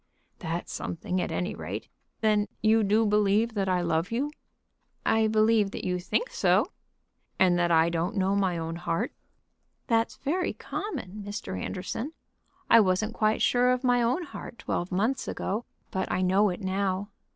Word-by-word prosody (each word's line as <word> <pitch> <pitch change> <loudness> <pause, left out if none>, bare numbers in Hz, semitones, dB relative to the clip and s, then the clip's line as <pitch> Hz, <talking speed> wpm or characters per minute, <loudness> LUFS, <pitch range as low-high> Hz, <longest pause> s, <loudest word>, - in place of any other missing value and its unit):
"That's 170 0 -4
something, 180 +2 -3
at - - -3
any 180 +4 -2
rate. - - -6 0.3
Then 210 -1 +3 0.2
you 220 0 +5
do 215 +3 +3
believe 210 +2 +2
that 195 -3 0
I 180 -1 +2
love 170 +1 0
you?" 270 +6 -1 0.7
"I 220 0 +3
believe 215 -1 +3
that - - -6
you 180 -1 0
think 465 - -1
so." - - +2 0.7
"And 180 -2 +4
that 175 0 +2
I 165 0 +4
don't 170 +5 -1
know 195 0 +2
my 190 -3 +1
own 165 0 -4
heart?" 175 +7 -2 0.7
"That's 230 -1 +1
very 350 +6 -1
common, 215 - -5
Mr. 205 - -5
Anderson. 190 - -4 0.5
I 230 - +8
wasn't 210 +2 +2
quite 215 -1 +1
sure 245 0 +4
of 250 +1 +1
my 245 -1 +3
own 250 +9 +1
heart 275 -5 -9
twelve 175 - -3
months 220 +9 0
ago, 215 +5 -2 0.3
but 190 - -2
I 185 - +1
know 195 +3 +4
it 180 +3 -5
now." 190 +1 -1
205 Hz, 165 wpm, -28 LUFS, 185-225 Hz, 0.7 s, I